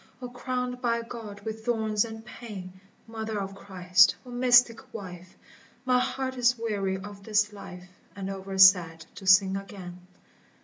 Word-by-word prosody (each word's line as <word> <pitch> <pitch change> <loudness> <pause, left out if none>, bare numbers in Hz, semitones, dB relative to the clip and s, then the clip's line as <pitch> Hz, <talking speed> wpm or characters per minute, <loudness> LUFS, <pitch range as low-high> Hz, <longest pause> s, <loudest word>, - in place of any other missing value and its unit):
O 250 - -6
crowned 250 0 -4
by 235 -2 0
God 225 -3 -9
with 220 +1 -6
thorns 220 -3 +1
and 225 0 -9
pain! 190 -6 -10 0.2
Mother 220 -1 -5
of 195 0 -5
Christ! 185 -1 +3
O 250 - -10
mystic 245 -1 +3
wife! 185 -3 -9 0.5
My 250 -1 +3
heart 260 +1 -3
is 245 0 +3
weary 200 -4 -2
of 200 +1 -10
this 210 0 +1
life 180 -3 -10 0.3
And 195 -1 -5
over 195 0 -6
sad 180 -4 +5
to 190 - -10
sing 190 0 +6
again. 195 -3 -8
210 Hz, 150 wpm, -27 LUFS, 190-235 Hz, 0.5 s, sing